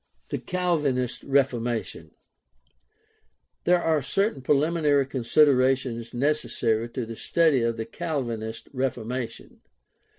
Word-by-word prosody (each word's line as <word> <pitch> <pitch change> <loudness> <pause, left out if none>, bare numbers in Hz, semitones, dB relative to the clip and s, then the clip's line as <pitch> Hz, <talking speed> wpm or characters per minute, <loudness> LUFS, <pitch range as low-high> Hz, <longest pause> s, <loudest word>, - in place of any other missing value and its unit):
THE - - -1
CALVINIST 150 -9 -1
REFORMATION 120 -7 0 1.6
There 180 +1 +4
are 160 -3 +1
certain 195 - 0
preliminary 145 0 +2
considerations 130 -2 +2
necessary 120 -4 0
to 120 0 -4
the 115 0 -7
study 160 0 +2
of 115 0 0
the 110 - -3
Calvinist 120 -10 -4
Reformation. 125 -2 -4
130 Hz, 95 wpm, -26 LUFS, 115-150 Hz, 1.6 s, There